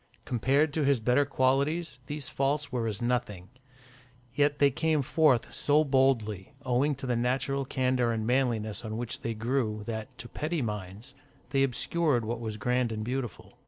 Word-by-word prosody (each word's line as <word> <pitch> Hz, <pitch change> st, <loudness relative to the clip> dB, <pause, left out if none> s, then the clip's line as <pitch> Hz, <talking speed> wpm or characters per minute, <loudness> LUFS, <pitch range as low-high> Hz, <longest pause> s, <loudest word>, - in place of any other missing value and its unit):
Compared 140 Hz, +5 st, +2 dB
to 155 Hz, -, 0 dB
his 140 Hz, -2 st, +3 dB
better 125 Hz, +5 st, +3 dB
qualities, 140 Hz, +1 st, 0 dB
these 145 Hz, -3 st, -4 dB
faults 140 Hz, +2 st, -1 dB
were 120 Hz, -3 st, -1 dB
as 110 Hz, +2 st, -3 dB
nothing; 105 Hz, -7 st, -2 dB, 0.8 s
yet 145 Hz, +2 st, +2 dB
they 140 Hz, -1 st, +4 dB
came 155 Hz, +1 st, +1 dB
forth 140 Hz, -4 st, +2 dB
so 150 Hz, +1 st, +3 dB
boldly, 130 Hz, -6 st, +1 dB
owing 130 Hz, +4 st, +2 dB
to 135 Hz, -, -7 dB
the 125 Hz, -2 st, 0 dB
natural 135 Hz, +3 st, 0 dB
candour 130 Hz, -2 st, +1 dB
and 110 Hz, -1 st, -2 dB
manliness 115 Hz, -4 st, 0 dB
on 110 Hz, -1 st, -4 dB
which 120 Hz, 0 st, -3 dB
they 115 Hz, -1 st, -3 dB
grew, 110 Hz, -2 st, -1 dB
that, 115 Hz, +3 st, -6 dB
to 115 Hz, +1 st, -7 dB
petty 155 Hz, +3 st, -2 dB
minds, 105 Hz, +2 st, -6 dB, 0.4 s
they 135 Hz, -1 st, +2 dB
obscured 135 Hz, 0 st, +1 dB
what 115 Hz, +1 st, -3 dB
was 110 Hz, -2 st, -4 dB
grand 125 Hz, +2 st, 0 dB
and 110 Hz, -1 st, -3 dB
beautiful. 125 Hz, -1 st, -5 dB
125 Hz, 165 wpm, -29 LUFS, 115-140 Hz, 0.8 s, they